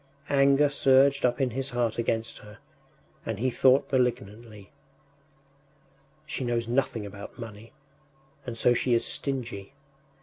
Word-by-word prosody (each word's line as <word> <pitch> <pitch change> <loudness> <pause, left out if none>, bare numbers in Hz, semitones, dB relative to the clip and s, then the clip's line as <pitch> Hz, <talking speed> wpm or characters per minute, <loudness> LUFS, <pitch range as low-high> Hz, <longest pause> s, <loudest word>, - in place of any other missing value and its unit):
Anger 140 +1 +4
surged 135 -1 +4
up 120 0 -3
in 130 -2 0
his 135 +3 -2
heart 120 -2 -1
against 115 0 -2
her, 105 0 -14 0.7
and 110 -2 -4
he 130 +4 0
thought 130 +2 +3
malignantly: 110 -5 -2 1.5
“She 150 - -4
knows 120 -1 -1
nothing 120 -3 -1
about 100 0 -10
money, 115 -2 -10 0.7
and 120 -2 -7
so 120 - +4
she 120 0 +1
is 115 - +2
stingy. 125 -7 -3
120 Hz, 130 wpm, -27 LUFS, 115-135 Hz, 1.5 s, Anger